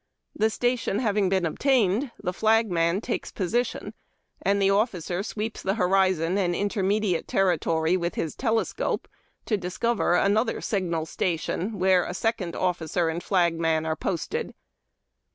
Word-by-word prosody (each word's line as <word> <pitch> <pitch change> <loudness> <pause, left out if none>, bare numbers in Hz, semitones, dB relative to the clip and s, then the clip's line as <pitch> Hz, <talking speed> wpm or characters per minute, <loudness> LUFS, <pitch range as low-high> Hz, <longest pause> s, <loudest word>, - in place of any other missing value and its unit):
The 220 - +2
station 245 -2 0
having 210 -4 +1
been 190 -2 +1
attained, 240 - +2
the 180 - -3
flagman 195 -4 +2
takes 240 - -3
position, 230 +6 -2 0.5
and 200 +1 +2
the 195 0 +3
officer 190 -4 0
sweeps 215 +1 -4
the 195 +1 0
horizon 185 -2 +2
and 175 -2 +1
inter 205 +2 -1
mediate 195 -2 0
territory 165 -2 +1
with 170 -2 -2
his 160 - -2
telescope 225 -3 -1 0.4
to 215 - +1
discover 190 +1 0
another 215 +5 +2
signal 170 -6 -1
station, 180 +5 -2
where 185 -1 +4
a 180 - -5
second 195 -6 -1
officer 175 -2 0
and 165 +2 -3
flagman 165 -4 +1
are 160 0 0
posted. 430 - -3
190 Hz, 135 wpm, -26 LUFS, 175-215 Hz, 0.5 s, where